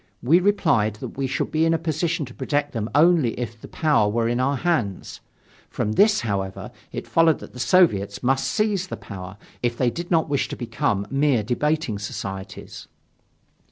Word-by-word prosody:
We 160 +8 +5
replied 160 - +2
that 105 - -8
we 135 -1 -1
should 130 0 -2
be 155 +1 +2
in 165 0 +3
a - - +2
position 160 0 -1
to 125 - -12
protect 145 +2 -1
them 115 -3 -3
only 155 -7 +4
if 115 -2 -5
the - - -9
power 150 -10 +2
were 115 +2 0
in 120 +1 0
our 135 +2 +1
hands. 125 - -2 0.5
From 105 - -2
this, 210 - +4
however, 100 -4 -3 0.2
it - - -5
followed 165 -2 +3
that - - -12
the 125 - -10
Soviets 115 - +2
must 135 +2 +1
seize 210 -4 0
the - - -6
power 95 0 -9 0.2
if 120 -1 -1
they 125 -2 +2
did 170 +5 -6
not 165 -2 +2
wish 145 -2 0
to - - -6
become 105 -4 -1
mere 135 -5 +2
debating 130 -1 -1
societies. 95 -1 -7
130 Hz, 185 wpm, -23 LUFS, 110-160 Hz, 0.5 s, We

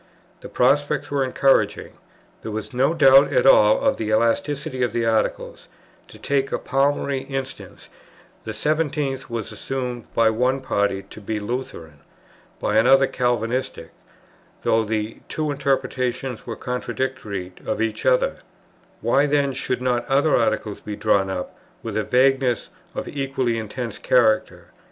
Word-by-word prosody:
The - - -10
prospect 145 +2 +1
was 140 -1 +1
encouraging; 135 +1 +1 0.5
there - - -6
was 110 +2 -5
no 135 +6 +2
doubt 135 -2 +6
at - - +2
all 105 -5 +6
of - - +2
the 110 - -3
elasticity 130 +4 0
of 120 -3 0
the 120 -1 0
Articles: 110 -1 -1 0.4
to - - -14
take 135 -1 -1
a - - 0
palmary 135 0 0
instance, 135 -1 -6 0.6
the 110 - -5
seventeenth 145 +2 -1
was 115 -3 -4
assumed 125 -3 -5
by 115 -1 +4
one 125 +4 +1
party 100 -6 -1
to 110 - -13
be 105 +1 -3
Lutheran, 105 - -6 0.6
by 105 - 0
another 135 +4 +6
Calvinistic, 125 0 -2 0.7
though 110 0 +2
the 110 0 -3
two 155 -1 -2
interpretations 130 -3 -2
were 115 - -4
contradictory 125 -7 -4
of - - -1
each 110 -1 -2
other; - - +2 0.6
why 140 +2 +3
then 140 -1 +1
should 125 -1 -3
not 125 -1 +1
other 145 +3 +2
Articles 110 -2 0
be 105 - -6
drawn 100 -3 +1
up 90 -1 -5 0.3
with - - -5
a - - 0
vagueness 130 -1 +2 0.2
of - - -3
an - - -9
equally 135 -4 -1
intense 110 0 -6
character? 110 -4 +1
125 Hz, 145 wpm, -22 LUFS, 110-135 Hz, 0.7 s, doubt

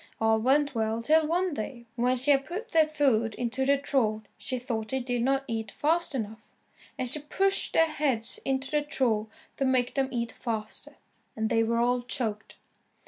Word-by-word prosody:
All 220 0 +3
went 280 +4 +2
well 220 -1 0
till 310 +4 +4
one 355 +1 +1
day, 235 0 -5
when 250 +1 +2
she 265 +4 +3
had 275 -1 +3
put 425 +8 -5
their 320 -5 +4
food 260 -8 +1
into 250 +2 -1
the 280 0 +5
trough 230 -6 0
she 255 - -3
thought 230 -3 -3
they 265 - 0
did 245 -1 -2
not 270 +2 +1
eat 225 -2 -3
fast 325 0 0
enough, 220 -2 -5 0.5
and 255 - -2
she 300 - -1
pushed 390 +7 +1
their 325 - +5
heads 270 -7 -1
into 270 0 -1
the 300 -1 +2
trough 245 -7 0 0.3
to - - 0
make 255 -2 +2
them 270 -1 0
eat 235 -2 -2
faster, 220 -3 -5 0.4
and 220 0 -1
they 225 - +3
were 230 +1 +1
all 245 +1 +2
choked. 230 -4 -3
255 Hz, 190 wpm, -28 LUFS, 225-285 Hz, 0.5 s, the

